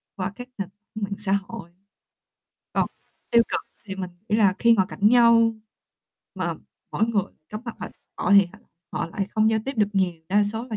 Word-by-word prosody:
qua 190 0 -3
các 245 +1 -9
nền 195 -2 -4
tảng 210 +1 -10
mạng 200 0 -2
xã 205 -2 +2 0.2
hội. 230 -7 -8 1.0
Còn - - +2 0.4
tiêu 235 0 +6
cực - - -1 0.2
thì 195 -2 -6
mình 185 -2 -4 0.2
nghĩ 210 - +2
là 195 -4 +4
khi 235 -1 +5
ngồi 190 -3 +2
cạnh 210 0 +2
nhau 230 -1 +5 0.8
mà - - -2 0.4
mỗi 220 - +1
người 205 -5 +1 0.2
cắm 215 +1 -6
mặt 235 - -6
vào - - -5
điện - - -24 0.2
thoại 200 - +2
thì 195 +3 -5 0.3
họ - - -2
lại 195 +3 -3
không 220 0 +3
giao 220 - +2
tiếp 270 - -2
được 210 -2 +3
nhiều, 190 -3 +2 0.2
đa 205 +2 +4
số 220 +3 0
là 215 - -2
210 Hz, 205 wpm, -24 LUFS, 195-225 Hz, 1.0 s, tiêu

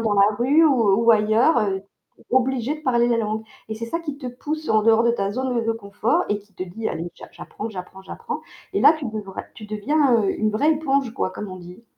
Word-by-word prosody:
dans 220 -2 +1
la 200 +1 +4
rue 285 +8 +4
ou 230 -7 +3
ou 230 - +7
ailleurs, 215 +5 +3 0.5
tu - - -21
es - - -30
obligé 260 +1 +1
de 305 - -10
parler 240 -3 +2
la 235 -1 +2
langue 220 0 -2 0.2
et 220 - -4
c'est 230 - -5
ça 335 +8 -3
qui 295 -4 -6
te 260 - -7
pousse 300 +5 -5
en 215 -1 +3
dehors 225 +1 +4
de 235 - +4
ta 200 -3 -1
zone 245 0 -1
de 225 - +1
confort 200 -2 -1
et 205 - 0
qui 205 0 -26
te 185 - -4
dit: 220 +5 -4
«Allez, 165 +2 -4
j'a - - -12
j'apprends, 215 - -7
j'apprends, 190 -1 -9
j'apprends» 190 - -6 0.3
et - - 0
là, - - +8
tu 290 - -6
devrais 210 -4 -5
tu 215 - -10
deviens, 240 +3 +2
heu, 195 - +2
une 215 0 +1
vraie 285 +9 +2
éponge, 275 -5 0
quoi, - - -1
comme 210 - -7
on 185 - -8
dit. 180 +6 -12
225 Hz, 245 wpm, -22 LUFS, 210-260 Hz, 0.5 s, là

